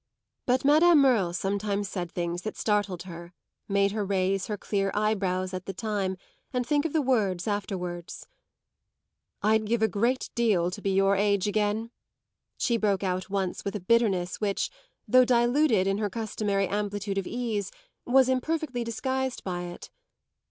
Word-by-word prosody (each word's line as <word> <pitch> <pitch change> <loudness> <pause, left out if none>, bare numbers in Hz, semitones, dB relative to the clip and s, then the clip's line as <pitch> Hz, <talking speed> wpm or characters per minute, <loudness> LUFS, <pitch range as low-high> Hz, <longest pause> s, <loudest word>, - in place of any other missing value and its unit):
But 255 +1 +2
Madame 315 +4 +6
Merle 245 -11 +4
sometimes 200 +2 -1
said 180 -3 -4
things 175 0 -3
that 215 - -5
startled 205 -4 0
her, 175 -1 -10 0.3
made 200 0 +2
her 210 0 -2
raise 195 0 0
her 210 - -3
clear 195 0 -1
eyebrows 195 -3 0
at 185 0 -5
the 195 - -5
time 200 -4 -2 0.3
and 250 -1 -1
think 290 +4 +1
of 325 - -2
the 315 -2 +2
words 205 -9 +1
afterwards. 180 -4 -4 1.2
"I'd 220 +1 +3
give 225 0 +1
a - - +5
great 235 +6 0
deal 200 -7 +2
to 205 - -7
be 200 - -1
your 195 +1 +3
age 200 0 +2
again," 215 +2 0 0.7
she 235 - +1
broke 205 -3 +1
out 185 +1 -2
once 190 -2 -2
with 200 - -3
a - - -2
bitterness 190 -3 +1
which, 200 -2 -1 0.4
though 255 +4 +6
diluted 240 -2 +3
in 195 +1 0
her 210 -1 0
customary 205 -2 -1
amplitude 205 0 -2
of 190 - -5
ease, 225 -5 -2 0.3
was 260 +1 +4
imperfectly 260 -1 -1
disguised 260 +3 -2
by 175 -2 -3
it. 175 0 -9
205 Hz, 160 wpm, -27 LUFS, 190-235 Hz, 1.2 s, Madame